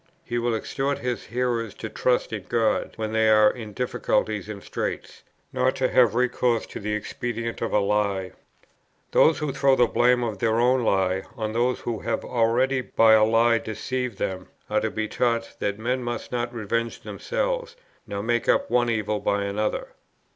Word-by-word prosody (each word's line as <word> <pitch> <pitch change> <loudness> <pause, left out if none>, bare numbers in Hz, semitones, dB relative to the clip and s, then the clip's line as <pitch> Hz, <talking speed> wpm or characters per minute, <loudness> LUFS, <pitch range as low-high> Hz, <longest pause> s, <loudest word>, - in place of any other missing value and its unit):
He 120 -4 -2
will 120 -1 0
exhort 135 +5 -2
his 125 -1 -3
hearers 115 -2 -2
to 110 - -6
trust 125 +1 0
in 105 -4 -5
God, 115 -2 +1
when 110 -1 -3
they 110 0 +3
are 110 0 +6
in 110 -4 -8
difficulties 110 -3 -1
and 100 -2 -7
straits, - - -5 0.3
nor 130 0 +2
to 130 -1 0
have 120 -4 +4
recourse 125 -1 +1
to - - -8
the 105 +1 -3
expedient 115 +2 -4
of 115 - -1
a - - +3
lie. 100 -2 0 0.8
"They 160 - +5
who 150 -3 -3
throw 135 -1 +3
the 125 - +5
blame 125 +1 +3
of 110 -5 -3
their 115 +1 +1
own 125 +2 +3
lie 95 -3 +1 0.2
on 110 -1 -3
those 120 +2 +1
who 115 -3 -3
have 115 - -2
already 125 +3 +2
by 115 -2 +4
a 110 0 +6
lie 115 +1 +4
deceived 120 +1 -4
them, 95 -1 -3 0.2
are - - +2
to - - 0
be 110 0 -3
taught 115 0 -1
that 100 0 -1
men 125 +4 -1
must 120 -1 -5
not 120 0 -2
revenge 115 +1 -2
themselves, - - -3 0.3
nor 100 0 -4
make 120 +1 0
up - - +3
for - - -7
one 120 -1 +3
evil 105 -2 -1
by 100 0 0
another." 105 +2 -2
115 Hz, 185 wpm, -25 LUFS, 110-125 Hz, 0.8 s, are